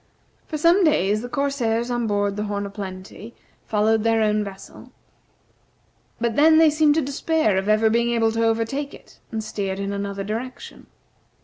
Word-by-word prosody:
For 310 Hz, -, -4 dB
some 340 Hz, +5 st, +4 dB
days 215 Hz, -, +2 dB
the 245 Hz, -, -7 dB
corsairs 245 Hz, -4 st, -1 dB
on 240 Hz, -1 st, -1 dB
board 205 Hz, -1 st, 0 dB
the 210 Hz, +1 st, -3 dB
"Horn 205 Hz, -1 st, -3 dB
o' 200 Hz, -, -7 dB
Plenty" 195 Hz, +2 st, -9 dB, 0.3 s
followed 215 Hz, +1 st, +2 dB
their 225 Hz, -1 st, +2 dB
own 210 Hz, 0 st, +1 dB
vessel, 195 Hz, -1 st, -11 dB, 1.3 s
but 230 Hz, -1 st, -1 dB
then 315 Hz, +2 st, +6 dB
they 320 Hz, -1 st, +6 dB
seemed 300 Hz, -1 st, +3 dB
to 320 Hz, -, +2 dB
despair 280 Hz, -4 st, 0 dB
of 190 Hz, +2 st, -1 dB
ever 215 Hz, +1 st, +4 dB
being 235 Hz, +2 st, +2 dB
able 230 Hz, -1 st, +2 dB
to 225 Hz, +1 st, -1 dB
overtake 230 Hz, +6 st, -1 dB
it, -, -, -19 dB
and 220 Hz, -2 st, -3 dB
steered 195 Hz, -3 st, -4 dB
in 200 Hz, 0 st, -3 dB
another 200 Hz, 0 st, -4 dB
direction. 230 Hz, +5 st, -7 dB
225 Hz, 175 wpm, -22 LUFS, 205-265 Hz, 1.3 s, then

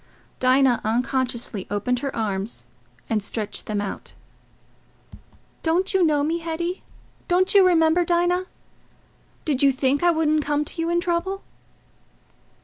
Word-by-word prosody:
Dinah 255 Hz, -1 st, +3 dB
unconsciously 240 Hz, -2 st, -1 dB
opened 205 Hz, +5 st, -1 dB
her 275 Hz, 0 st, -4 dB
arms 200 Hz, -, -3 dB, 0.4 s
and 220 Hz, -2 st, 0 dB
stretched 210 Hz, +1 st, -5 dB
them 210 Hz, -1 st, -1 dB
out. 205 Hz, -1 st, -5 dB, 1.5 s
"Don't 355 Hz, +4 st, 0 dB
you 380 Hz, -1 st, +3 dB
know 300 Hz, -3 st, +2 dB
me, 325 Hz, +3 st, 0 dB
Hetty? 340 Hz, +2 st, -3 dB, 0.5 s
Don't 370 Hz, +1 st, +2 dB
you 400 Hz, -1 st, +7 dB
remember 330 Hz, 0 st, +4 dB
Dinah? 350 Hz, +2 st, +1 dB, 1.0 s
Did 285 Hz, -4 st, 0 dB
you 280 Hz, -1 st, +6 dB
think 270 Hz, +1 st, 0 dB
I 350 Hz, -, +4 dB
wouldn't 310 Hz, -2 st, +2 dB
come 295 Hz, +1 st, 0 dB
to 330 Hz, -, -5 dB
you 330 Hz, -, -1 dB
in 345 Hz, 0 st, +1 dB
trouble?" 355 Hz, +3 st, -2 dB
300 Hz, 135 wpm, -23 LUFS, 250-345 Hz, 1.5 s, you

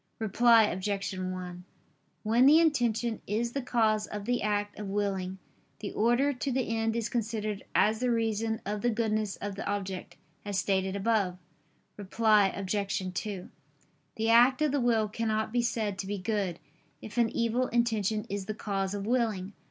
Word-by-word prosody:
Reply 225 Hz, +2 st, +5 dB
Obj. 195 Hz, 0 st, -2 dB
1: 185 Hz, -1 st, -5 dB, 0.6 s
When 230 Hz, +4 st, +4 dB
the 305 Hz, +3 st, +8 dB
intention 240 Hz, -8 st, +1 dB
is 230 Hz, +4 st, -1 dB
the 275 Hz, -, -2 dB
cause 220 Hz, -4 st, +1 dB
of 205 Hz, -1 st, -6 dB
the 245 Hz, +1 st, 0 dB
act 205 Hz, 0 st, -1 dB
of 210 Hz, -, -5 dB
willing, 195 Hz, -2 st, -2 dB, 0.4 s
the 205 Hz, -1 st, -6 dB
order 240 Hz, +6 st, +2 dB
to 270 Hz, +2 st, -3 dB
the 245 Hz, -3 st, -1 dB
end 225 Hz, 0 st, 0 dB
is 230 Hz, -1 st, -1 dB
considered 215 Hz, -3 st, -3 dB
as 215 Hz, +1 st, +3 dB
the 250 Hz, 0 st, 0 dB
reason 225 Hz, -1 st, 0 dB
of 205 Hz, +1 st, -3 dB
the 240 Hz, -, +2 dB
goodness 215 Hz, -2 st, 0 dB
of 205 Hz, 0 st, -5 dB
the 195 Hz, -, -6 dB
object, 195 Hz, -2 st, -4 dB, 0.3 s
as 205 Hz, -2 st, -3 dB
stated 190 Hz, 0 st, 0 dB
above. 200 Hz, -3 st, +1 dB, 0.6 s
Reply 210 Hz, 0 st, +3 dB
Obj. 195 Hz, -1 st, -2 dB
2: 195 Hz, -2 st, -4 dB, 0.7 s
The 225 Hz, +1 st, 0 dB
act 250 Hz, +5 st, +5 dB
of 300 Hz, -, +2 dB
the 285 Hz, -1 st, +1 dB
will 225 Hz, -3 st, +2 dB
cannot 220 Hz, 0 st, -2 dB
be 245 Hz, -, +3 dB
said 215 Hz, -4 st, -1 dB
to 190 Hz, -, -4 dB
be 205 Hz, +1 st, -2 dB
good, 195 Hz, -3 st, -2 dB, 0.4 s
if 220 Hz, +3 st, -5 dB
an 235 Hz, -1 st, +4 dB
evil 235 Hz, +3 st, 0 dB
intention 220 Hz, -3 st, 0 dB
is 200 Hz, -1 st, -4 dB
the 215 Hz, -, -3 dB
cause 195 Hz, -2 st, -2 dB
of 200 Hz, -1 st, -4 dB
willing. 215 Hz, -5 st, 0 dB
215 Hz, 170 wpm, -29 LUFS, 200-230 Hz, 0.7 s, the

